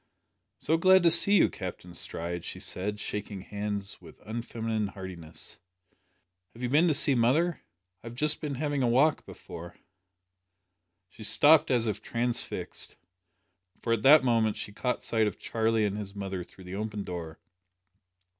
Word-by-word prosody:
"So 160 - +1
glad 185 +2 +5
to 170 - +6
see 200 +5 +5
you, 195 - +6
Captain 90 -1 -7
Stride," 85 0 -2
she - - -7
said, 105 +3 -3
shaking 105 -2 -5
hands 100 0 -5
with 85 -3 -15
unfeminine 115 -1 -3
heartiness. 90 -4 -8 1.0
"Have 120 - -9
you 125 - 0
been 155 +6 +4
to 155 - +4
see 140 0 +4
mother? 140 +8 +2 0.4
I - - -9
have 115 - -8
just 150 +4 +1
been 150 -3 -3
having 145 0 -1
a 125 - +2
walk 135 +5 +3
before 85 +1 -10 0.7
" 90 0 -53
She - - -15
stopped 150 +8 +5
as 120 -3 +2
if 105 -2 -2
transfixed, 120 0 -3 0.9
for 115 - 0
at 115 - 0
that 145 +3 +7
moment 115 -4 +2
she 105 - -5
caught 125 +4 -2
sight 110 -2 +1
of - - -4
Charlie 110 -1 0
and 105 0 -2
his 100 -1 -7
mother 95 -2 -4
through 95 - -16
the 90 +1 -9
open 105 -1 -4
door. 85 -3 -6
110 Hz, 165 wpm, -28 LUFS, 95-130 Hz, 1.0 s, that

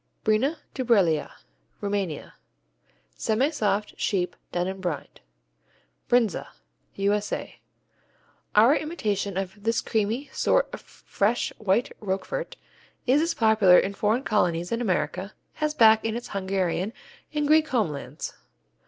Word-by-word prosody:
Brina 245 +9 +2 0.2
Dubreala 200 - +2 0.5
Rumania 200 -6 -3 0.8
Semisoft, 220 -4 0
sheep, 180 -3 0 0.2
done 175 0 -1
in 190 0 -5
brine. 175 -5 -4 0.9
Brindza 235 -6 +2 0.5
U.S.A. 205 +1 -1 1.0
Our 230 +7 +7
imitation 210 - -2
of 190 -1 -2
this 225 +2 +1
creamy 225 +6 -1
sort - - +2
of - - -6
fresh, 215 +4 -1
white 210 +3 +1
Roquefort 215 - -3 0.5
is 270 +4 +4
as 335 +1 0
popular 215 -5 +6
in 195 - +2
foreign 215 +6 +1
colonies 175 -6 +1
in 230 +1 0
America 185 -2 -1 0.2
as 305 0 0
back 220 -3 +6
in 225 0 -1
its 240 - -6
Hungarian 190 0 -1 0.4
and 300 -1 0
Greek 310 +1 +5
homelands. 200 - -2
210 Hz, 115 wpm, -26 LUFS, 190-245 Hz, 1.0 s, Our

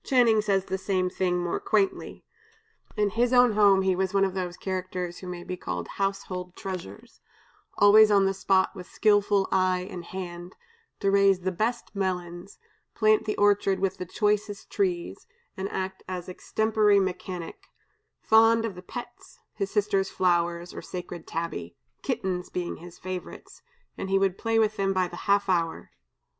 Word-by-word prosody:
Channing 235 -5 +4
says 195 -2 +1
the 190 0 -3
same 185 -2 0
thing 180 -1 0
more 175 - -2
quaintly: 390 -2 -1 0.7
"In 210 -1 +2
his 235 +3 +1
own 245 -1 +6
home 200 -2 +5
he 190 -1 +2
was 190 +1 -1
one 195 0 +4
of 190 - -3
those 180 -2 -4
characters 185 -2 -4
who 185 - -9
may 175 -1 -6
be 180 - -5
called 90 - -5
household 185 -2 -3
treasures; 180 - -8 0.6
always 210 +1 +7
on 200 -2 +4
the 195 - +1
spot 190 0 +1
with 180 -2 -9
skillful 205 -2 +2
eye 185 -1 +1
and 175 -2 -7
hand, 175 -1 -7 0.5
to 195 -2 +2
raise 195 -2 +4
the 185 +1 -1
best 230 +5 -2
melons, 180 -1 -4 0.4
plant 215 -1 +3
the 215 - -2
orchard 205 -2 +3
with 195 0 -1
the 180 - -6
choicest 210 +1 -1
trees, 360 -1 -2 0.3
and 195 0 -4
act 190 0 -4
as 180 -1 -5
extempore 210 +2 +2
mechanic; 180 -2 -4 0.6
fond 225 +1 +5
of 220 - -3
the 180 - -10
pets, 240 +6 -10 0.2
his 195 -2 -3
sister's 200 -2 +1
flowers 175 -1 0
or - - -7
sacred 175 -2 -7
tabby 90 - -5 0.2
kittens 180 -1 -2
being 180 -1 -4
his 175 +1 -12
favorites, 185 0 -8 0.4
he 195 0 +1
would 195 -1 +1
play 225 0 0
with 215 -1 +2
them 195 0 +1
by 185 -1 +1
the 175 - -9
half 200 0 +3
hour." 170 -3 -1
190 Hz, 165 wpm, -27 LUFS, 180-205 Hz, 0.7 s, always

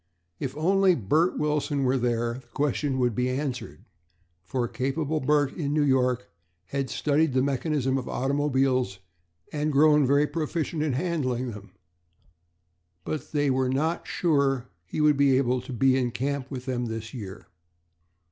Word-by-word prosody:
If 135 +1 -4
only 190 +3 +4
Bert 155 - +1
Wilson 150 -1 0
were 130 0 +2
there, 120 0 -1
the - - -28
question 145 -1 0
would 125 -2 +1
be 125 +4 0
answered, 130 - -4 0.6
for 120 +6 -2
capable 145 +5 -1
Bert 145 0 +2
in 145 -3 -2
New 150 - +3
York 125 -3 +2 0.4
had 135 -2 -2
studied 150 +2 +1
the 130 0 +2
mechanism 135 -1 0
of 125 - -7
automobiles 135 -5 +1 0.6
and 150 0 0
grown 150 -1 +5
very 140 +2 +4
proficient 155 +1 -2
in 150 -3 0
handling 130 -6 -1
them; 105 -2 -11 1.3
but 155 - -5
they 145 -2 +1
were 130 0 +1
not 155 +6 -1
sure 140 -5 +2
that 120 - -11 0.2
he 90 - -3
would 150 -1 +4
be 140 -2 +4
able 125 -1 +1
to 130 - -9
be 130 +2 +3
in 125 -2 +1
camp 135 +3 -3
with 130 -2 -6
them 125 -2 -2
this 115 0 -6
year. 105 -5 -8
135 Hz, 155 wpm, -26 LUFS, 125-150 Hz, 1.3 s, grown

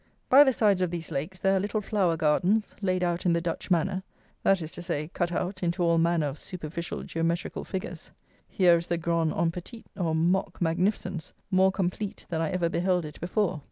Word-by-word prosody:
By 275 +3 +9
the 270 - +3
sides 205 -6 +2
of 180 - +1
these 170 -1 -5
lakes 155 +6 -3
there 195 +1 +2
are - - +3
little 205 +3 -1
flower 195 -5 +1
gardens, 180 +8 +2
laid 185 -2 +1
out 175 0 0
in 175 - +3
the 170 - +2
Dutch 165 +2 -4
manner; 185 +2 +1 0.4
that 195 -1 +3
is 160 -1 -6
to - - -8
say, 160 -3 -3
cut 175 -1 -1
out 185 +2 -3
into 175 0 0
all 170 -1 +3
manner 165 -1 +2
of 145 0 -4
superficial 170 -1 -6
geometrical 165 +1 -2
figures. 180 -3 -6 0.4
Here 175 -3 +4
is 170 - -7
the 170 - 0
grand 165 -1 +1
en 165 0 +1
petit, 185 +7 -9
or 165 -4 0
mock 175 +4 +1
magnificence, 180 0 -1 0.2
more 190 0 +5
complete 195 +1 -3
than 165 -2 -1
I 165 - 0
ever 180 -3 0
beheld 180 0 +1
it 150 -1 -10
before. 180 -1 0
175 Hz, 205 wpm, -27 LUFS, 165-190 Hz, 0.4 s, By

